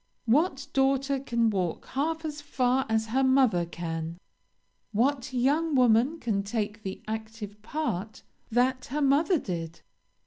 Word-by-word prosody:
What 280 +3 +2
daughter 270 0 +2
can 235 -4 +1
walk 185 -5 -2
half 320 +4 -1
as 300 -1 -4
far 260 -2 +1
as 220 0 +1
her 265 +1 +3
mother 260 -10 +3
can? 165 0 -5 0.8
What 260 +4 +1
young 285 +5 +1
woman 250 +5 +4
can 215 -7 0
take 210 +1 -3
the 190 -2 -6
active 220 -1 -6
part 220 - -3 0.3
that 250 +2 +1
her 295 +4 -3
mother 295 +7 +4
did? 170 - -5
245 Hz, 135 wpm, -28 LUFS, 210-275 Hz, 0.8 s, woman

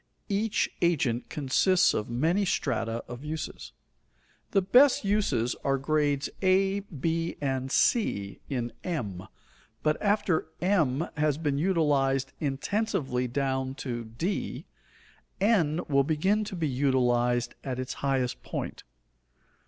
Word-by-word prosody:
Each 205 +2 +1
agent 135 -9 +1
consists 175 +7 +3
of 105 - -2
many 160 +12 +1
strata 115 -10 -1
of 120 +3 -8
uses. 155 0 -5 0.8
The 195 - +2
best 250 +4 +5
uses 145 - +1
are 135 0 +2
grades 145 0 +1
a, 195 +1 +3
b, 165 -2 -2
and 135 -2 -2
c, 100 - +1
in 120 -4 -2
M; 105 - -4 0.6
but 155 0 +1
after 205 -6 +1
M 165 -6 +2
has 150 -1 +2
been 145 -3 -1
utilized 145 -6 +1
intensively 140 - -1
down 130 +1 -1
to 120 -4 -4
d, 140 - -3 0.7
N 180 -6 +2
will 140 -1 +3
begin 190 +9 +1
to 200 - -6
be 165 -3 -1
utilized 125 -3 +1
at 130 -2 -3
its 130 0 -3
highest 135 -3 0
point. - - -5
145 Hz, 120 wpm, -28 LUFS, 130-185 Hz, 0.8 s, best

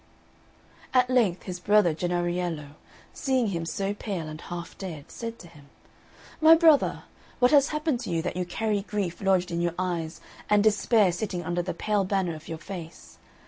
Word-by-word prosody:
At 255 0 +4
length 220 -8 +2
his 180 -2 -6
brother 205 -3 +4
Jennariello, 175 -2 -2 0.4
seeing 260 -5 0
him 165 -3 -3
so 195 +5 -2
pale 195 -6 -4
and 155 +1 -8
half 170 -1 -7
dead, 165 -7 -7
said 230 0 -6
to 175 - -13
him, 145 -4 -17 0.7
"My 320 +1 +9
brother, 320 -3 +4 0.3
what 250 0 +4
has 285 -2 +6
happened 300 -4 -1
to 240 - -6
you, 165 -2 -1
that - - -3
you 180 - -1
carry 205 +3 -1
grief 195 -4 -3
lodged 185 -2 +2
in 170 0 -1
your 175 -1 -1
eyes, 175 -3 -3 0.3
and 210 -1 +4
despair 215 -2 +4
sitting 180 -1 -3
under 175 +1 0
the 180 - -4
pale 210 -2 0
banner 190 -3 0
of 155 0 -11
your 165 - -5
face? 165 -1 -10
185 Hz, 180 wpm, -27 LUFS, 170-215 Hz, 0.7 s, My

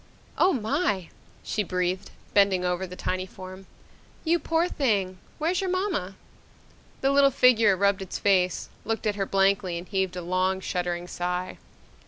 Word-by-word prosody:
"Oh, 370 - +4
my!" 210 - 0 0.3
she 215 - -1
breathed, 180 -1 -2 0.2
bending 195 -3 +4
over 180 +1 -1
the 180 - -9
tiny 185 0 -2
form. 185 +1 -11 0.6
"You 340 +1 +2
poor 330 +1 +1
thing. 200 - 0 0.2
Where's 345 +4 0
your 380 - -1
mama?" 365 - -1 0.9
The 270 - +3
little 275 0 +6
figure 230 -6 +4
rubbed 200 +1 +2
its 190 - -5
face, 185 -3 +1
looked 225 +1 -2
at 210 - +2
her 195 -1 -2
blankly 195 -2 +2
and 175 +2 -7
heaved 190 -2 -1
a 180 - -5
long, 185 +2 0
shuddering 175 -2 -3
sigh. 180 +1 -3
195 Hz, 155 wpm, -26 LUFS, 185-225 Hz, 0.9 s, little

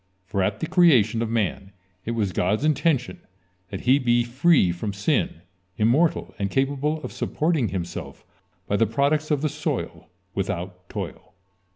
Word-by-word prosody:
For 95 +1 -2
at 100 +3 -1
the - - 0
creation 140 - +4
of 115 - -1
man 100 -3 -2 0.3
it 115 - -2
was 100 -4 0
God's 105 +10 0
intention 150 -3 +1 0.5
that 95 -3 -6
he 130 +3 +4
be 120 -2 +2
free 130 - +3
from 100 +4 -4
sin, 100 - 0 0.4
immortal, 130 +10 +2
and 100 -1 -1
capable 140 +5 0
of - - -5
supporting 155 -6 0
himself 85 -2 -6 0.4
by 100 - 0
the 115 - +3
products 145 +6 +1
of 150 -2 0
the - - +3
soil 150 +1 -4 0.2
without 90 -2 -4
toil. - - -7
115 Hz, 155 wpm, -24 LUFS, 100-150 Hz, 0.5 s, creation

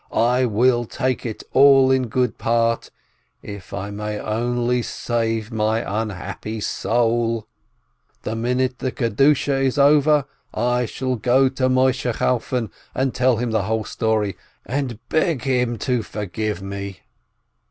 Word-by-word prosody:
I 125 +2 +2
will 120 +2 +2
take 130 +1 -2
it 110 - -6
all 135 -1 +6
in 130 -1 +2
good 125 +2 -1
part, 115 0 +1 0.5
if 100 -2 -9
I 100 +1 -5
may 105 +1 -4
only 120 +3 0
save 115 -1 -2
my 110 -1 0
unhappy 105 +1 -5
soul! 115 0 0 0.8
The 110 - -3
minute 125 +2 -1
the 130 - -2
Kedushah 135 +4 +2
is 135 +1 0
over 145 0 +4 0.3
I 125 +1 +1
shall 130 +1 -2
go 130 +4 +3
to 130 0 0
Moisheh 130 -1 +2
Chalfon, 125 -3 0 0.4
tell 130 -2 +2
him 120 0 -2
the 110 -1 +1
whole 110 0 -1
story, 110 -4 -1 0.3
and 130 -3 -2
beg 155 -5 +1
him 125 -3 0
to 125 +2 0
forgive 105 0 -4
me." 100 -1 -6
120 Hz, 130 wpm, -21 LUFS, 110-130 Hz, 0.8 s, all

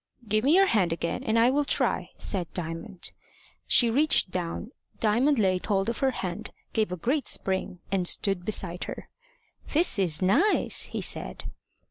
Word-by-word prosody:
"Give 215 +1 +1
me 290 +5 +4
your 390 +1 +6
hand 200 - +1
again, 170 +8 -3
and 225 -2 0
I 235 +2 +5
will, 290 +2 +1
try" - - 0
said 180 -5 -2
Diamond. 175 +3 -5 0.6
She 235 -2 +3
reached 280 -7 +3
down, 180 +6 -4 0.3
Diamond 245 +7 +2
laid 185 -4 +1
hold 195 0 +1
of 235 - -3
her 270 - +2
hand, 195 -3 -5 0.2
gave 215 -4 0
a 180 - -3
great 265 - -1
spring, 190 -2 -2
and 185 -2 +1
stood 195 -1 0
beside 180 -3 0
her. - - -8 0.6
"This 305 - +2
is 170 -5 +2
nice!" 195 - +3
he - - -5
said. - - 0
205 Hz, 165 wpm, -27 LUFS, 180-245 Hz, 0.6 s, your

